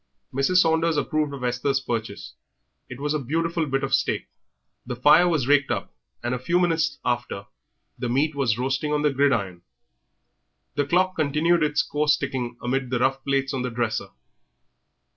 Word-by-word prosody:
Mrs. 135 +8 +1
Saunders 165 -2 +3
approved 155 -1 0
of 140 -2 -7
Esther's 125 +3 0
purchase; 115 -5 -5 0.6
it 125 - -8
was 145 +1 -1
a 155 - 0
beautiful 165 +4 -1
bit 135 0 -1
of 135 0 -2
steak. - - 0 0.5
The 125 0 -5
fire 150 +8 +5
was 155 -7 +1
raked 145 -1 +4
up, - - -3 0.3
and 120 +1 -1
a 125 - -2
few 170 +7 +1
minutes 165 -5 +1
after 120 -5 -2 0.5
the 120 - -2
meat 145 +5 +1
was 130 -6 0
roasting 135 +4 -1
on 150 0 +1
the 150 - +3
gridiron. 115 -11 +1 1.1
The 145 +1 0
clock 185 +4 +2
continued 155 +3 +2
its 150 -1 +2
coarse 150 0 +1
ticking 125 -4 -4
amid 130 +1 -1
the 125 - 0
rough 135 +2 0
plates 135 0 0
on 130 - -2
the 125 - -2
dresser. 115 -4 -2
140 Hz, 170 wpm, -24 LUFS, 125-150 Hz, 1.1 s, fire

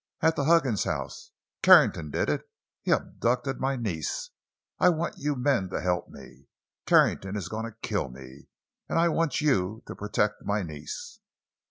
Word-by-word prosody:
At 160 0 +3
the 140 - -1
Huggins 145 - +3
house! - - -4 0.3
Carrington 75 -2 +6
did - - -1
it! - - -2 0.3
He - - -5
abducted 125 +3 0
my 135 +1 0
niece! 95 - -3 0.5
I 180 - +6
want 170 0 -2
you 145 0 -1
men 125 -7 +1
to - - -3
help 90 -1 -1
me! 70 - -14 0.4
Carrington 95 +1 +3
is 100 - -4
going 110 +1 -4
to 115 -1 -9
kill 100 - -1
me! 65 +2 -13 0.4
And - - 0
I 170 +1 +4
want 165 -2 0
you 110 -7 +1
to - - -7
protect 105 0 -1
my 105 0 0
niece!" 75 -3 -8
110 Hz, 165 wpm, -27 LUFS, 90-140 Hz, 0.5 s, Carrington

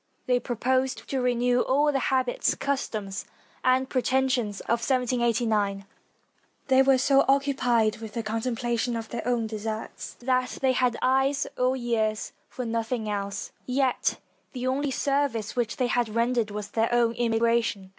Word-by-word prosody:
They 250 -1 +2
proposed 255 +2 -1
to 265 -2 0
renew 245 0 +2
all 290 +3 +2
the 275 - 0
hab 260 -1 +2
its, 245 - 0
customs, 215 -8 -3 0.4
and 255 +1 +3
pretensions 255 -5 0
of 235 - 0
1789. 235 -5 +1 0.8
They 260 0 +6
were 270 0 +5
so 275 +1 +4
occupied 250 -6 +2
with 220 -1 -8
the 230 - -2
contemplation 235 +2 -1
of 225 -1 -5
their 235 - -4
own 240 -2 +1
deserts 220 0 -5
that 255 0 -1
they 265 -1 +3
had 250 -2 +1
eyes 270 +2 +2
or 255 +1 +1
ears 225 -4 -1 0.2
for 250 - -5
nothing 230 0 -2
else, 200 0 -4 0.2
yet 260 0 +1 0.4
the 250 -1 -4
only 275 +3 0
service 275 -5 -1
which 235 -2 -1
they 255 - +1
had 245 -2 +1
rendered 230 0 +1
was 210 0 -6
their 225 +1 +1
emi 235 -1 +1
gration. 230 -4 +1
245 Hz, 150 wpm, -26 LUFS, 225-260 Hz, 0.8 s, They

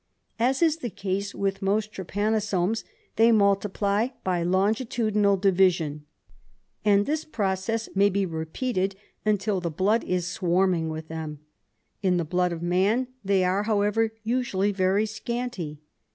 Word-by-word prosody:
As 260 +6 +2
is 320 -1 +3
the 245 -7 -4
case 200 +1 -3
with 195 0 -1
most 210 +2 0
trypanu 205 +4 -1
somes, 200 +1 0 0.3
they 225 +1 +6
multiply 200 +1 +2 0.2
by 180 -2 0
longitudinal 205 +2 +1
division, 180 -6 +2 0.8
and 205 -1 +4
this 310 +1 -1
pro 200 -10 -1
cess 220 +4 -3
may 200 +1 +4
be 200 0 0
repeated 185 +5 -2 0.4
till 200 0 -1
the 170 - -2
blood 195 +8 +1
is 180 -1 -1
swarming 180 -2 +1
with 160 0 -6
them. 155 -2 -6 0.6
In 185 -3 +2
the 170 - -1
blood 180 +2 +1
of 170 0 -5
man 200 +9 +1
they 195 -1 +2
are, 185 +2 +1
however, 215 +1 +1
usually 220 -4 0
very 195 +2 +2
scanty. 220 -8 -4
195 Hz, 140 wpm, -26 LUFS, 180-220 Hz, 0.8 s, they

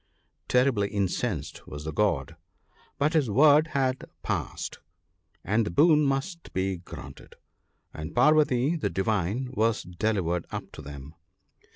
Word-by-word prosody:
' - - -49
"Terribly 125 -5 +3
incensed 100 - -2
was 75 0 -7
the 80 0 -5
God, 80 -5 0 0.6
but 150 +4 +1
his 150 -7 +2
word 150 +7 +6
had 135 -4 -1 0.2
passed, - - -3 0.6
and 110 +3 +2
the 105 - -3
boon 150 - +5
must 140 +6 -2
be 95 0 -1
granted; 70 -6 -11 0.6
and 80 +1 -7
Parvati 145 +1 +4
the 155 - -1
Divine 105 +4 -1
was 115 -1 +1
delivered 90 -2 -1
up - - -6
to - - -10
them. 70 +1 -9
110 Hz, 135 wpm, -27 LUFS, 90-135 Hz, 0.6 s, word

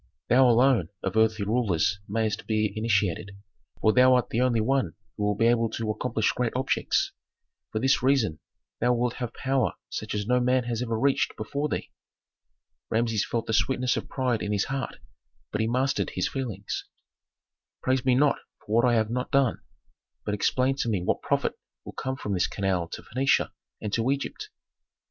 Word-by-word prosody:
Thou, 130 +1 +6
alone, 120 - +4
of 95 +2 -2
earthly 110 -2 +3
rulers 100 -5 +1
mayst 110 +1 -1
be 110 -1 +1
initiated, 100 -3 0 0.4
for 110 - +4
thou 130 0 +6
art 125 - +1
the 115 - +1
only 125 -3 +2
one 135 +4 +1 0.2
who 105 - -3
will 105 0 +1
be 115 - +2
able 115 -1 +3
to 110 0 -2
accomplish 110 0 0
great 125 -2 -1
objects. 130 +1 +1 0.6
For - - -2
this 135 +4 +3
reason 125 - +2 0.4
thou 120 +1 +3
wilt 120 0 -1
have 120 -3 -3
power 135 0 0 0.2
such - - -4
as 105 -1 -1
no 125 +3 +3
man 125 +1 +2
has 120 -1 -3
ever 115 -2 -1
reached 140 +2 +1
before 140 +7 -2
thee." - - -4 1.0
Rameses 115 -1 +1
felt 115 -1 -2
the 110 - -2
sweetness 125 +4 +2
of - - -4
pride 125 -4 0
in 105 - -2
his 100 - +1
heart, 135 -2 -3 0.6
but 105 - -1
he 110 - +1
mastered 130 +4 0
his - - -1
feelings. 110 -8 -4 1.0
"Praise 130 -1 +1
me 130 -2 +3
not 145 +2 +3 0.3
for 105 - -5
what 120 - +5
I 120 -1 +4
have 110 -1 +1
not 125 +1 -2
done; 135 -4 +2 0.6
but 105 - -1
explain 130 +6 +2
to 120 - -1
me 100 -5 0
what - - 0
profit - - 0 0.3
will - - -8
come 130 0 -3
from 105 -6 -4
this 90 -1 +2
canal 95 -4 -1
to - - -8
Phœnicia 130 +5 +1 0.3
and 105 -1 -5
to 115 +2 +1
Egypt?" 140 - -3
115 Hz, 185 wpm, -27 LUFS, 105-130 Hz, 1.0 s, Thou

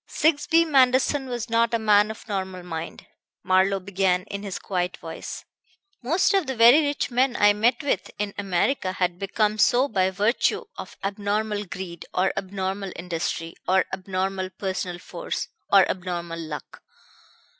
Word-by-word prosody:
"Sigsbee 320 +2 +3
Manderson 265 -1 +3
was 240 -2 -3
not 230 0 +2
a - - +3
man 210 -1 +4
of 220 +1 -9
normal 190 -3 -4
mind," 165 -1 -6 0.4
Marlowe 190 +1 +3
began 185 -1 0
in 200 0 -6
his 200 -2 -5
quiet 180 -1 -2
voice. 165 0 -8 0.6
"Most 325 +12 +2
of 385 -7 +2
the 265 - -2
very 240 +6 +7
rich 285 -3 -1
men 250 +1 +2
I 205 0 +5
met 235 +5 +1
with 285 - -1
in 205 -1 -3
America 190 +1 0
had 180 -1 -1
become 210 +2 0
so 245 +5 +4
by 190 -6 +1
virtue 210 - +1
of - - -9
abnormal 205 +1 -1
greed, 175 -2 -7
or 190 +1 +2
abnormal 190 0 -3
industry, 165 -1 -3
or 190 0 +3
abnormal 190 0 -2
personal 185 -1 -4
force, - - -5 0.2
or 195 -1 +7
abnormal 175 -2 -4
luck. 155 -2 -8
200 Hz, 150 wpm, -24 LUFS, 185-230 Hz, 0.6 s, very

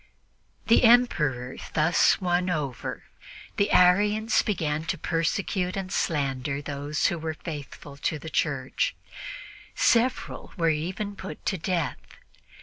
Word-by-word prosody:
The 230 - +5
Emperor 150 - +3 0.2
thus 160 +2 +4
won 180 0 +1
over, 145 -8 -3 0.5
the 200 0 +2
Arians 210 +5 +4
began 155 -7 -1
to 165 - -2
persecute 180 +2 -1
and 190 -1 -4
slander 140 -4 -1
those 145 +1 -3
who 170 - +1
were 160 0 -3
faithful 145 -3 -8
to 155 +2 -1
the 155 - -10
Church; 135 -4 0 0.8
several 245 +2 +1
were 165 -2 +2
even 185 +7 -3
put 155 - -8
to 190 - 0
death. 165 -6 -1
165 Hz, 120 wpm, -26 LUFS, 145-190 Hz, 0.8 s, The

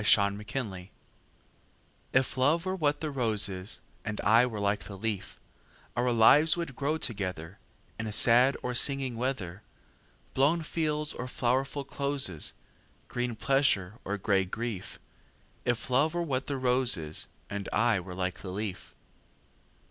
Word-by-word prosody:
A - - -4 0.3
Match 100 -3 -5 1.2
IF 130 0 +2
love 150 +7 +2
were 185 0 -1
what 150 -5 0
the 155 -2 -2
rose 110 -6 +2
is, 95 +1 -5 0.2
And 105 0 -4
I 115 +4 +5
were 110 -4 -5
like 100 0 0
the 100 - -8
leaf, 100 -2 -3 0.6
Our 125 +1 +1
lives 145 +8 +6
would 165 -6 -4
grow 145 +4 0
togetherIn 95 - -4 0.5
sad 120 +5 +5
or 125 - -2
singing 135 0 +1
weather, 115 -7 -3 0.7
Blown 150 +5 +3
fields 150 -1 0
or 125 - -5
flowerful 130 +3 0
closes, 140 - -1 0.6
Green 120 -1 -2
pleasure 115 -6 +2
or 100 +1 -2
gray 100 -1 +2
grief; 105 +1 -5 0.7
If 120 -2 0
love 150 +6 +3
were 175 - 0
what 135 -4 -2
the 140 - -2
rose 125 -3 +2
is, 80 -1 -4 0.2
And 100 -1 -5
I 115 -5 +3
were 90 0 -8
like 90 0 -2
the 95 - -7
leaf. 95 -1 -5
120 Hz, 140 wpm, -29 LUFS, 100-140 Hz, 1.2 s, lives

